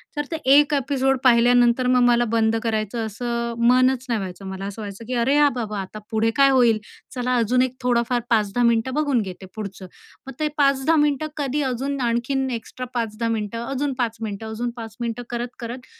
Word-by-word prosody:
तर 295 0 -2
ते - - -1 0.3
1 295 0 -3
एपिसोड 270 -1 +1
पाहिल्यानंतर 245 0 +4
मग 250 0 +4
मला 240 0 +4
बंद 225 -1 +2
करायचं 225 0 -2
असं 235 +2 -3
मनच 255 +1 +3
नाही 230 -2 +1
व्हायचं, 190 0 -7
मला 190 0 -6
असं 200 +2 -6
व्हायचं 205 +2 -8
की 255 - -3
अरे, 270 +4 +2
हां 295 -1 +5
बाबा 215 -4 -4
आता 195 +2 -7
पुढे 225 +1 +1
काय 275 0 +6
होईल 240 -5 +4 0.4
चला 250 0 0
अजून 240 +2 +2
एक 255 0 -1
थोडंफार 245 0 +1
5 210 -3 +2
10 245 - +2
मिनिटं 235 +2 +1
बघून 285 -4 +1
घेते 190 -1 -7
पुढचं, 200 -3 -7 0.4
मग 270 - -7
ते 305 - +1
5 275 -1 +3
10 325 - +6
मिनिटं 295 +1 0
कधी 290 0 -1
अजून 270 +3 -3
आणखीन 260 +3 0
एक्स्ट्रा 240 +2 -6
5 225 -3 -2
10 230 - +1
मिनिटं, 225 0 -3
अजून 275 +2 -2
5 230 -2 -1
मिनिटं 220 0 -5
अजून 235 +2 -3
5 225 -2 -8
मिनिटं 235 0 -3
करत-करत 240 +1 -6
240 Hz, 200 wpm, -22 LUFS, 225-260 Hz, 0.4 s, काय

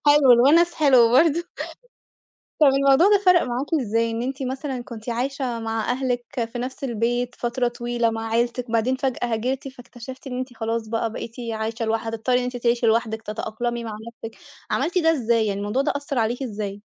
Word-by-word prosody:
حلو، 290 -3 +7
الوَنَس 320 +8 +5
حلو 255 -7 +5
برضه. 330 +4 +4 1.1
طَب 305 - +6
الموضوع 275 +5 +5
ده 410 -1 +5
فرق 360 -2 +6
معاكِ 250 +3 -2
إزاي؟ 230 -1 0
إن 225 +1 -3
أنتِ 270 +2 -4
مثلًا 260 -1 -4
كنتِ 230 -1 -10
عايشة 250 0 -2
مع 225 0 -2
أهلِك 250 -1 -1 0.3
في 245 - -5
نَفْس 255 +3 -5
البيت 240 0 -1
فترة 245 +1 -1
طويلة 240 -1 -1
مع 225 0 -4
عيلتِك 235 +1 -1
بعدين 230 +3 +1
فجأة 260 -2 -1
هاجرتِ، 255 +5 -2
فاكتشفتِ 255 +1 -11
إن 250 -1 -4
أنتِ 255 -1 -5
خلاص 225 0 -2
بقى 225 0 -1
بقيتِ 230 0 -7 0.2
عايشة 220 +1 -3
لوحدِك 225 +1 -1
هتضطري 245 +3 +1
إن 250 - -1
أنتِ 250 0 -4
تعيشِي 235 0 +1
لوحدِك 225 0 +1
تتأقلمي 230 +2 -4
مع 220 -2 -5
نَفْسِك، 225 -1 -10 0.3
عملتِ 355 +2 0
ده 325 -1 +4
إزاي، 235 -6 +1
يعني 200 -1 -1
الموضوع 210 +7 0
ده 295 - 0
أثّر 285 -2 -3
عليكِ 235 +3 0
إزاي؟ 205 -4 -5
240 Hz, 185 wpm, -23 LUFS, 225-265 Hz, 1.1 s, حلو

